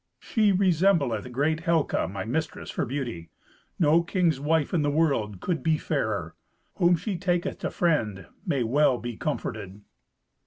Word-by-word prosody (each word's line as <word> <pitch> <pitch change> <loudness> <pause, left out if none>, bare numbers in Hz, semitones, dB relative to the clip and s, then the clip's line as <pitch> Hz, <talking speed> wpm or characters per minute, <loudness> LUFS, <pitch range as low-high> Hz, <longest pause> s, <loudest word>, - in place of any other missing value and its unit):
"She 215 -3 +2
resembleth 170 - +2
great 150 +5 +1
Helca, 165 -3 +1
my 95 -1 -4
mistress, 155 +8 -3
for - - -2
beauty. 120 -11 -4 0.5
No 160 0 +4
king's 170 -4 +1
wife 155 +2 +1
in 170 - +2
the 145 - +1
world 140 - +1
could 175 -3 -1
be 160 -1 +2
fairer. 110 - -2 0.4
Whom 175 -2 +4
she 180 +2 -4
taketh 175 -2 -1
to - - -2
friend 110 - 0 0.2
may 135 -4 0
well 130 +2 +3
be 120 -1 -5
comforted!" 105 -8 -4
150 Hz, 150 wpm, -26 LUFS, 115-170 Hz, 0.5 s, No